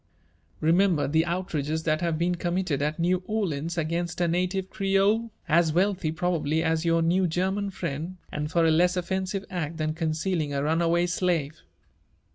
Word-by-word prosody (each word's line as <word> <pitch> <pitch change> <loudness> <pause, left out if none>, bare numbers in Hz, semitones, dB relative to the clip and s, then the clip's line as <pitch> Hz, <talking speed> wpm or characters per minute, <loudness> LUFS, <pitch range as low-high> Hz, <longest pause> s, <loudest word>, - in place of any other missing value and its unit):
Remember 170 0 +3
the 160 +4 +2
outrages 160 -3 -2
that 155 0 0
have 170 -2 0
been 175 +2 +1
committed 175 -4 -1
at 150 +2 -1
New 180 +2 +2
Orleans 170 -6 -2
against 170 +2 -2
a 175 - +2
native 185 +2 -1
Creole, 200 +3 +2 0.2
as 165 -1 +3
wealthy 185 -2 +1
probably 160 -2 0
as 160 0 +1
your 165 0 +3
new 180 +3 +2
Ger 180 +3 0
man 200 0 -2
friend, 170 -1 -5
and 150 0 -3
for 165 +1 +2
a 160 - +4
less 180 +3 +3
offensive 190 +2 -2
act 165 -3 -3
than 155 -1 -1
concealing 160 -1 -1
a 140 - 0
runaway 170 +3 +2
slave. 170 -4 -1
170 Hz, 165 wpm, -26 LUFS, 160-185 Hz, 0.2 s, a